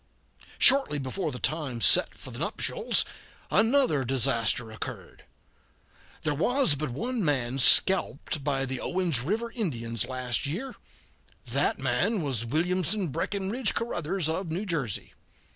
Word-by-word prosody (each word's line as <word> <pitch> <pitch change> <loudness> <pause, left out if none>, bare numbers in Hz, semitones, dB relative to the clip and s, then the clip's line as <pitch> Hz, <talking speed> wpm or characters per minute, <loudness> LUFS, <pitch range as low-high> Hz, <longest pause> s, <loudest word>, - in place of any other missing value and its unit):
Shortly 270 - +6
before 150 +5 -4
the 125 - -7
time 145 -4 -3
set - - +6
for - - -10
the - - -9
nuptials - - 0 0.5
another 225 - +2
disaster 120 -2 0
occurred. 110 - -9 1.0
There 155 - 0
was 245 - +2
but 145 0 -3
one 230 - -3
man 135 -4 -1
scalped 155 -1 +4
by 135 -1 -1
the 130 -1 -5
Owens 175 -8 0
River 220 - -3
Indians 120 - -3
last 130 -1 -2
year. 235 - -5 0.7
That - - -1
man 215 -7 0
was 120 -5 -2
Williamson 180 - 0
Breckinridge 200 - -2
Caruthers 185 -6 -2
of 165 +1 -3
New 185 +6 -3
Jersey. 150 - -4
155 Hz, 125 wpm, -27 LUFS, 130-195 Hz, 1.0 s, Shortly